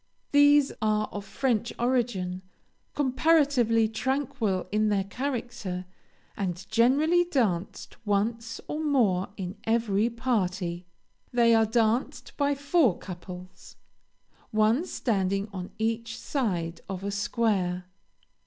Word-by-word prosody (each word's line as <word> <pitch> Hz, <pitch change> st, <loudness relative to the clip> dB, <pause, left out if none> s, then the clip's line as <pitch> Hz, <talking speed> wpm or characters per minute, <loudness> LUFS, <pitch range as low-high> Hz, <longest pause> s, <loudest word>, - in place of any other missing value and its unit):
These 290 Hz, -1 st, +6 dB
are 215 Hz, 0 st, +1 dB
of 205 Hz, -, -5 dB
French 235 Hz, +1 st, 0 dB
origin, 235 Hz, -7 st, 0 dB, 0.5 s
comparatively 265 Hz, -5 st, +3 dB
tranquil 225 Hz, -5 st, -1 dB
in 215 Hz, +1 st, +2 dB
their 200 Hz, -2 st, +1 dB
character, 235 Hz, -5 st, -4 dB, 0.5 s
and 190 Hz, -2 st, -3 dB
generally 285 Hz, +10 st, +4 dB
danced 215 Hz, -, -1 dB
once 225 Hz, +2 st, -1 dB
or 310 Hz, +1 st, -3 dB
more 215 Hz, -12 st, +2 dB
in 185 Hz, 0 st, -5 dB
every 225 Hz, -1 st, +1 dB
party. 185 Hz, -8 st, -2 dB, 0.4 s
They 235 Hz, -1 st, +4 dB
are 225 Hz, -1 st, +4 dB
danced 230 Hz, +2 st, 0 dB
by 285 Hz, -1 st, +1 dB
four 280 Hz, -, +2 dB
couples, 180 Hz, 0 st, -10 dB, 0.7 s
one 220 Hz, +10 st, +2 dB
standing 195 Hz, -, 0 dB
on 185 Hz, -1 st, -5 dB
each 225 Hz, +1 st, -2 dB
side 175 Hz, -, -2 dB
of 190 Hz, -1 st, -5 dB
a 200 Hz, -, -2 dB
square. 200 Hz, -3 st, 0 dB
220 Hz, 105 wpm, -27 LUFS, 195-255 Hz, 0.7 s, These